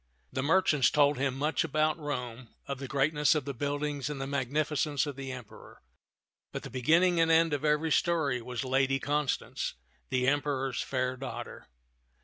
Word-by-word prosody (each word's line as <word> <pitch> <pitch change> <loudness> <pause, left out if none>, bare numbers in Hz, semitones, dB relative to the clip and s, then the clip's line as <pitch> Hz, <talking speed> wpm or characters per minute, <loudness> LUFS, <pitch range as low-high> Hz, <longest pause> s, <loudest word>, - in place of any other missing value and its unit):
The 130 - -1
merchants 150 -3 +3
told 145 -2 +3
him 135 -1 0
much 150 +3 +1
about 155 +1 +1
Rome, 125 -5 -5 0.2
of 140 -1 -5
the 135 - -5
greatness 145 +3 +2
of 150 -4 -1
the 140 - -3
buildings 145 +2 -2
and 145 -2 -5
the 135 - -3
magnificence 145 +2 0
of 145 -2 -5
the 135 -1 -6
Emperor; 125 - -11 0.7
but - - -5
the - - -8
beginning 165 +7 +3
and 165 0 +4
end 165 -1 +4
of 145 - -2
every 150 +1 +1
story 150 -7 +1
was 125 +2 -4
Lady 135 +1 +2
Constance, 145 0 -2 0.3
the 130 -1 +1
Emperor's 135 -2 0
fair 130 -1 -1
daughter. 135 - -7
140 Hz, 165 wpm, -30 LUFS, 130-150 Hz, 0.7 s, and